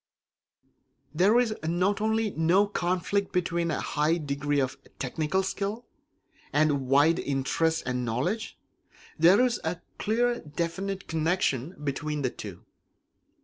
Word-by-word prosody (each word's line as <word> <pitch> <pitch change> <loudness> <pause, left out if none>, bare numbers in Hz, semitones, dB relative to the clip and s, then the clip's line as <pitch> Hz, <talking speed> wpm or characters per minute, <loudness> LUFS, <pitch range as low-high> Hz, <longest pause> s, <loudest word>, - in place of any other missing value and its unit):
There 190 +8 +4
is 235 -3 +1
not 180 +5 +1
only 220 0 +1
no 175 +5 +3
conflict 190 +1 -1
between 170 -1 0
a 155 - -1
high 155 +3 +1
degree 145 -1 -1
of 130 -1 0 0.2
technical 155 +8 -1
skill 200 +5 -3 0.7
and 145 -3 +2
wide 145 +5 +4
interests 150 +4 0
and 125 0 -2
knowledge; 170 - -2 0.6
there 175 +6 +6
is 245 -2 -1
a 165 +2 -2 0.2
clear 240 +3 +2
and 155 -11 -8
definite 190 +3 -3
connection 160 -2 0
between 150 +1 -2
the 130 - 0
two. - - -9
170 Hz, 125 wpm, -27 LUFS, 145-195 Hz, 0.7 s, there